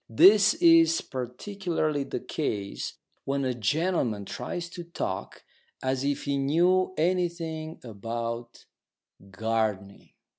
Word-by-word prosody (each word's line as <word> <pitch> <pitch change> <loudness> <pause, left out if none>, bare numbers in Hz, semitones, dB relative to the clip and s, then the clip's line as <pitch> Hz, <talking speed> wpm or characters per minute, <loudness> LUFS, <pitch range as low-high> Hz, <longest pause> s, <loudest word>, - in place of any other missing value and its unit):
This 200 - +7
is 330 -1 +6
particularly 155 - -2
the - - -4
case 105 -10 -3 0.3
when 140 0 -1
a 130 - 0
gentleman 120 - 0
tries 170 - -5
to 175 - -7
talk 100 - -5 0.4
as 130 0 0
if 140 0 -1
he 140 -1 0
knew 175 +7 +3
anything 165 -2 -1
about 115 +1 -5 0.6
gardening. 105 -1 -2
140 Hz, 105 wpm, -27 LUFS, 115-175 Hz, 0.6 s, This